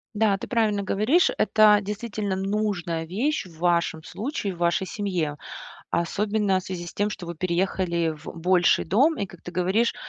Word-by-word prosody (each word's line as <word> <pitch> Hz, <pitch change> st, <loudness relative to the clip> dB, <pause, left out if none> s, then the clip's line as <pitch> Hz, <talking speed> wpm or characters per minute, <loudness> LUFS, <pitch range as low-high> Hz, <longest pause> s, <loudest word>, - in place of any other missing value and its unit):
Да, 205 Hz, -2 st, +3 dB
ты -, -, -7 dB
правильно 215 Hz, -4 st, +1 dB
говоришь. 215 Hz, -, +2 dB
Это, 215 Hz, -1 st, +5 dB
действительно, 210 Hz, -1 st, -3 dB
нужная 190 Hz, -4 st, -2 dB
вещь 230 Hz, -, -1 dB
в 165 Hz, -3 st, -15 dB
вашем 170 Hz, -2 st, +1 dB
случае, 210 Hz, -, -4 dB
в -, -, -15 dB
вашей 175 Hz, +2 st, +1 dB
семье, 175 Hz, -8 st, -2 dB, 0.5 s
особенно 200 Hz, +3 st, 0 dB
в -, -, -14 dB
связи 180 Hz, -2 st, -6 dB
с 170 Hz, -, -9 dB
тем, 205 Hz, +1 st, 0 dB
что 185 Hz, -4 st, -7 dB
вы 170 Hz, -, -5 dB
переехали 170 Hz, -1 st, 0 dB
в 150 Hz, -, -16 dB
больший 175 Hz, +1 st, +3 dB
дом 270 Hz, -, +3 dB
и, 200 Hz, -, -1 dB
как 175 Hz, -2 st, -15 dB
ты -, -, -7 dB
говоришь, 190 Hz, +6 st, +1 dB
190 Hz, 175 wpm, -25 LUFS, 175-210 Hz, 0.5 s, Это